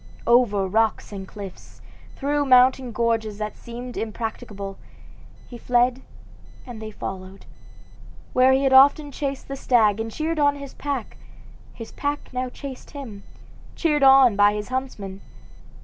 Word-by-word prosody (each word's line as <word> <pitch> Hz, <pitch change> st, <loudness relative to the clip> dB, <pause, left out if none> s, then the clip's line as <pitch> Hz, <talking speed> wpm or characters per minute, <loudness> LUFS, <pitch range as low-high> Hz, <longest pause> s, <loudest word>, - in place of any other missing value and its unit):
Over 235 Hz, -5 st, +3 dB
rocks 220 Hz, +3 st, 0 dB
and 195 Hz, -2 st, -7 dB
cliffs, 200 Hz, -2 st, -11 dB, 0.4 s
through 290 Hz, +1 st, 0 dB
mountain 255 Hz, 0 st, +4 dB
gorges 225 Hz, -2 st, -1 dB
that 210 Hz, 0 st, -4 dB
seemed 240 Hz, +1 st, -9 dB
impracticable, 210 Hz, -3 st, -5 dB, 0.7 s
he 240 Hz, -, -10 dB
fled 245 Hz, +2 st, +1 dB, 0.6 s
and 240 Hz, -3 st, -9 dB
they 220 Hz, -, -6 dB
followed. 190 Hz, -2 st, -8 dB, 0.9 s
Where 255 Hz, +1 st, +5 dB
he 265 Hz, +1 st, +2 dB
had 270 Hz, -1 st, +2 dB
often 285 Hz, +2 st, +6 dB
chased 275 Hz, -1 st, -4 dB
the 275 Hz, -, -5 dB
stag 225 Hz, -6 st, +2 dB
and 225 Hz, 0 st, -4 dB
cheered 315 Hz, +5 st, -2 dB
on 285 Hz, -1 st, +3 dB
his 280 Hz, -1 st, -9 dB
pack, 280 Hz, -6 st, -5 dB, 0.5 s
his 230 Hz, -, -10 dB
pack 290 Hz, -1 st, -4 dB
now 255 Hz, 0 st, -2 dB
chased 270 Hz, 0 st, -9 dB
him, 250 Hz, -9 st, -9 dB, 0.5 s
cheered 300 Hz, -4 st, +1 dB
on 265 Hz, -4 st, +7 dB
by 205 Hz, +1 st, +4 dB
his 210 Hz, +1 st, -5 dB
huntsmen. 215 Hz, -7 st, -5 dB
245 Hz, 140 wpm, -23 LUFS, 210-270 Hz, 0.9 s, on